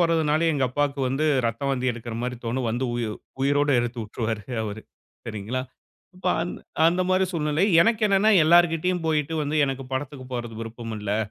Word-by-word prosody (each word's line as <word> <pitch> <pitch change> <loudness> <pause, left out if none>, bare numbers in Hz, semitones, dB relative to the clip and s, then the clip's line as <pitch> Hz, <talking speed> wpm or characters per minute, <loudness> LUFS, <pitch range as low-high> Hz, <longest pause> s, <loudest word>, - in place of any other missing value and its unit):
போறதுனாலும் 165 -1 +2
எங்க 140 -3 +1
அப்பாக்கு 145 +1 -1
வந்து 135 +4 0 0.2
இரத்த 115 +1 -2
வாந்தி 130 -1 0
எடுக்கிற 120 0 -7
மாரி 125 0 -3
தோணும். 120 +2 -1
வந்து 120 +3 -1
உயி 120 -2 -1 0.3
உயிரோட 145 +1 +2
எடுத்து 120 0 -4
வுட்டுருவாரு 110 0 -4 0.2
அவர், 105 0 -5 0.5
சரிங்களா? 115 +4 -3 0.5
இப்ப 185 - -7
அந் 175 - -2 0.3
அந்த 175 +2 +2
மாரி 185 0 +3
சூழ்நிலை. 155 +1 +1 0.2
எனக்கு 225 +4 +1
என்னன்னா 200 +2 +4
எல்லார்கிட்டயும் 175 +1 +3
போய்ட்டு 155 0 0
வந்து, 150 +1 -1
"எனக்கு 135 -1 -3
படத்துக்கு 130 0 -4
போறதுக்கு 120 -2 -5
விருப்பம் 115 0 -6
இல்லை." 105 0 -1
135 Hz, 165 wpm, -25 LUFS, 120-160 Hz, 0.5 s, என்னன்னா